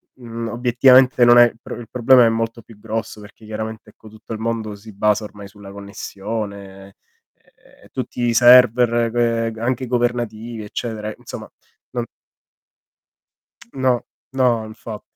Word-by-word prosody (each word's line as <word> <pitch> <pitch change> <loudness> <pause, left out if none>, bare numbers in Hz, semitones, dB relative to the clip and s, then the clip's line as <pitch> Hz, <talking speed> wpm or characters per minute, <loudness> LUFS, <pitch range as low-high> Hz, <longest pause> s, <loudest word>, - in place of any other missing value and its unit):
mhmm, 115 -2 -7
obiettivamente 125 +2 +4
non 120 0 +7
è 120 - +9
il 115 -1 -4
pro - - -8
il 120 -2 -10
problema 125 0 +5
è - - +4
molto 115 +1 -3
più 115 -1 -17
grosso, 110 0 -5
perché 105 +1 -15
chiaramente 110 0 -7
ecco, 110 - -17
tutto 110 +1 -10
il 110 - -6
mondo 110 -2 -3
si 105 +2 -13
basa 105 +2 +1
ormai 105 -1 -10
sulla 100 0 -13
connessione 100 0 -7
e 100 - -25 0.9
e - - -19
tutti - - -5
i 120 -1 +1
server 120 -1 +5 0.4
g 110 - -12
anche 125 +2 -2
governativi, 120 -2 -2
eccetera, 110 0 -5
insomma - - -9 0.4
non 120 -1 -3 1.7
No, 130 -2 0 0.3
no 125 -4 +1
infa 110 0 -9
115 Hz, 145 wpm, -20 LUFS, 105-120 Hz, 1.7 s, è